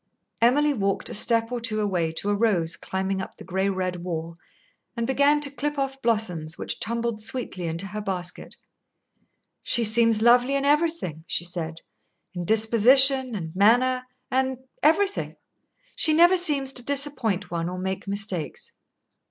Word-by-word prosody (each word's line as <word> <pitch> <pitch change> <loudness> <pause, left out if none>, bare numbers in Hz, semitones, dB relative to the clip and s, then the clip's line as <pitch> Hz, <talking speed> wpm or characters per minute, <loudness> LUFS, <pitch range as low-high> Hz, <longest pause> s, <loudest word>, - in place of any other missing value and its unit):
Emily 290 +5 +3
walked 195 -5 -2
a - - -6
step 230 +2 +3
or 245 -1 -4
two 220 -2 -1
away 180 -6 -1
to 200 +5 -2
a - - +1
rose 195 -7 +1
climbing 190 0 -3
up - - -9
the - - -11
gray 190 +2 -1
red 185 -2 -3
wall, 170 -1 -6 0.6
and 235 - -1
began 280 +3 +2
to 285 -1 +2
clip 295 +1 -4
off 270 -1 -3
blossoms, 180 -9 -1
which - - -4
tumbled 235 -1 -3
sweetly 215 -6 -3
into 165 +4 -2
her 210 +2 -6
basket. 185 -3 -5 1.0
"She 235 - 0
seems 225 0 +4
lovely 245 +3 +4
in 275 0 -1
everything," 295 - 0
she 170 - -1
said, 165 -2 -5 0.5
"in 175 -1 -5
disposition 245 +5 +5
and 165 -3 -7
manner 250 +5 +2 0.2
and 260 0 0 0.2
everything. 390 +7 +1 0.6
She 310 - +3
never 345 +4 +5
seems 285 -7 +2
to 250 - -4
disappoint 270 - -1
one 170 0 -3
or 180 - -6
make 190 +2 -5
mistakes." 200 -5 -4
225 Hz, 155 wpm, -24 LUFS, 185-265 Hz, 1.0 s, disposition